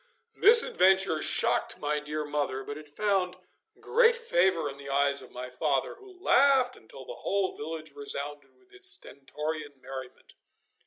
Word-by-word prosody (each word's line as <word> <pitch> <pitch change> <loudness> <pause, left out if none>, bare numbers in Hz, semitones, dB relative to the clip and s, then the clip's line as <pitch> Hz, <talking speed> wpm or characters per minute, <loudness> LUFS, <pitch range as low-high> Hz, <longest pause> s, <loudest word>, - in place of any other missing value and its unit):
This 460 +3 +7
adventure 190 -3 +3
shocked - - +1
my 150 0 -1
dear 150 +1 -4
mother, 145 -3 -2
but 145 - -6
it 155 0 -11
found 185 +2 -1 0.4
great 470 0 +4
favour 185 - +1
in 140 -1 -7
the 140 0 -10
eyes 140 0 +1
of - - -13
my 125 0 -7
father, 135 +2 -1
who 385 -3 -16
laughed 270 -7 +4
until - - -13
the - - -9
whole 195 -1 -1
village 155 +1 -7
resounded 145 +1 -7
with 385 0 -29
his 390 -1 -4
stentorian 150 - -5
merriment. 130 -1 -10
155 Hz, 155 wpm, -28 LUFS, 145-235 Hz, 0.4 s, This